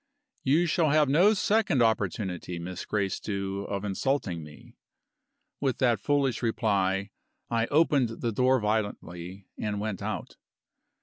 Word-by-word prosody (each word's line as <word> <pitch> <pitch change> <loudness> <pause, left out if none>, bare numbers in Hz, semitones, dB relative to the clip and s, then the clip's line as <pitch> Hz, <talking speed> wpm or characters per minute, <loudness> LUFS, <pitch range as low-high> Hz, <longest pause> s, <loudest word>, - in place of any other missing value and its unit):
"You 155 +6 +3
shall 165 -1 +2
have 150 0 +4
no 185 +10 +5
second 195 - +2
opportunity, 95 -5 -1
Miss 90 +1 -6
Gracedieu, 100 -1 -2
of 100 0 -3
insulting 100 - -1
me." 75 0 -14 0.9
With 135 -3 0
that 120 -4 +2
foolish 135 +1 +1
reply, 100 -4 0 0.4
I 115 0 +1
opened 145 -5 +3
the 115 - 0
door 130 +4 +3
violently 100 -4 -3
and 105 -1 -2
went 105 -2 -3
out. - - -5
110 Hz, 125 wpm, -28 LUFS, 95-135 Hz, 0.9 s, no